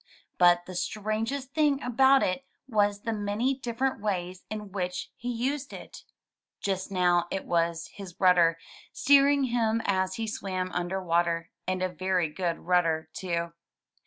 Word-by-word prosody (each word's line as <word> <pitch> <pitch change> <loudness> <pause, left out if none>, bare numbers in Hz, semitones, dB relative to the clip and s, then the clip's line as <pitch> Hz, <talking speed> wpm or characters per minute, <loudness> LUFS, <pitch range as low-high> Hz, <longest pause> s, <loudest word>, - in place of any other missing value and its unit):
But 175 0 +5
the 185 - -8
strangest 215 +9 -2
thing 295 -3 +3
about 265 +2 +4
it 185 +9 -1 0.2
was 205 -4 +1
the 230 - -2
many 210 +5 0
different 260 0 -2
ways 185 -3 -3
in 210 -1 -6
which 180 -2 -3
he 245 +1 -4
used 265 +4 -2
it. - - -10 0.5
Just 190 0 -2
now 175 -2 +2
it 195 - -3
was 170 -1 0
his 190 -4 -10
rudder, 175 -3 +5 0.3
steering 280 +1 +4
him 230 -3 +1
as 190 -1 +1
he 225 - -3
swam 185 -4 -3
imder 180 +2 -2
water 170 -1 +1
— - - -54
and 185 0 -1
a - - +2
very 185 -2 0
good 170 +1 -2
rudder, 165 -3 +1
too. 170 -2 -2
190 Hz, 155 wpm, -28 LUFS, 175-230 Hz, 0.5 s, But